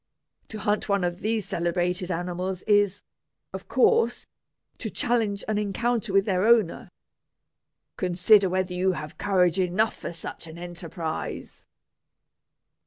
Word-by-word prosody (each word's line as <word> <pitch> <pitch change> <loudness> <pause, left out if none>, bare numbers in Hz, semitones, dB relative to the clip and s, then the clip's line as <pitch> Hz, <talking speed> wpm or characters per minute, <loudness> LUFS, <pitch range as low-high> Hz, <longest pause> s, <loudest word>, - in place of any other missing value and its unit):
To 220 - -7
hunt 210 +1 -1
one 200 -2 +2
of 175 0 -2
these 220 -2 -1
celebrated 175 +2 -1
animals 180 +1 -3
is, 205 -2 +2 0.5
of - - -7
course, 465 0 +2 0.5
to - - -4
challenge 220 -5 0
an 215 -1 0
encounter 230 +2 -1
with 195 0 +3
their 185 -2 +1
owner. 220 -6 +3 1.1
Consider 185 +2 +4
whether 185 0 -1
you 185 +1 +1
have 155 -1 -7
courage 180 -3 +2
enough 185 +5 +1
for - - -6
such 165 0 -8
an 160 +1 -10
enterprise." 170 -2 -6
185 Hz, 125 wpm, -26 LUFS, 175-210 Hz, 1.1 s, Consider